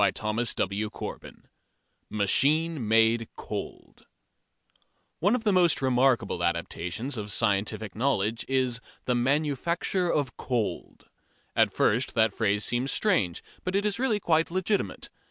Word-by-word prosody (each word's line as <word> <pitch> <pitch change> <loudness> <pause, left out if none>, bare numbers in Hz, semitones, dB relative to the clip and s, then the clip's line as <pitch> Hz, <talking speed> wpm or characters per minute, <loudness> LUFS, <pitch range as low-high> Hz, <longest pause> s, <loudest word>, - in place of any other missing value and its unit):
CHAPTER 110 +3 0
V 100 +3 -3 1.2
MACHINE 140 +7 +1
MADE 115 +1 +3
COLD - - -8 1.1
One 200 +8 +3
of 240 - -3
the 210 -3 +2
most 175 -4 +4
remarkable 125 -8 +2
adaptations 85 +8 -2
of 105 -1 -3
scientific 105 0 0
knowledge 115 -2 0
is 130 -3 0 0.2
the 125 - +1
"manufacture 150 +7 0
of 140 -5 -1
cold." 120 -5 -3 0.5
At - - +4
first 120 +5 +1
that 110 -3 +3
phrase 105 -1 +1
seems 125 +3 0
strange, 135 - +1 0.2
but 185 +1 -2
it 200 +1 +1
is 210 +2 0
really 240 -5 +1
quite 165 -4 +2
legitimate. 185 +3 -2
125 Hz, 120 wpm, -27 LUFS, 110-165 Hz, 1.2 s, most